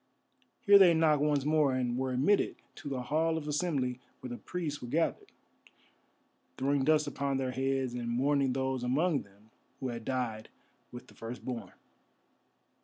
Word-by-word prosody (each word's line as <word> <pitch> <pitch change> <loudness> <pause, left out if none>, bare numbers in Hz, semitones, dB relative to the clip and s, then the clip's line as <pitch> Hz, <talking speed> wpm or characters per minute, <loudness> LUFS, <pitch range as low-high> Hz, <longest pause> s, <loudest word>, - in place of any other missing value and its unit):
Here 200 -1 +7
they 175 -4 +7
knocked 155 -2 +3
once 145 -2 +1
more, 150 -3 +3
and 125 -2 -1
were 130 +1 -1
admitted 140 +11 +2 0.2
to 145 - -8
the 130 -2 -3
Hall 160 +4 +1
of 150 -2 -5
Assembly 145 -5 -1 0.2
where 125 - -8
the 120 - -5
priests 160 -5 -5
were 120 - -6
gathered, 160 +7 -1 1.3
throwing 140 +1 +1
dust 150 +1 +3
upon 140 -1 -2
their 130 -1 -1
heads 135 0 -1
and 120 -1 -4
mourning 135 +2 +1
those 130 -1 -1
among 145 +5 +1
them 100 +2 -20 0.3
who 130 - -3
had 115 -1 -6
died 115 -4 -3 0.4
with 125 - -9
the - - -18
Firstborn. 115 -3 -7
135 Hz, 160 wpm, -31 LUFS, 125-150 Hz, 1.3 s, Here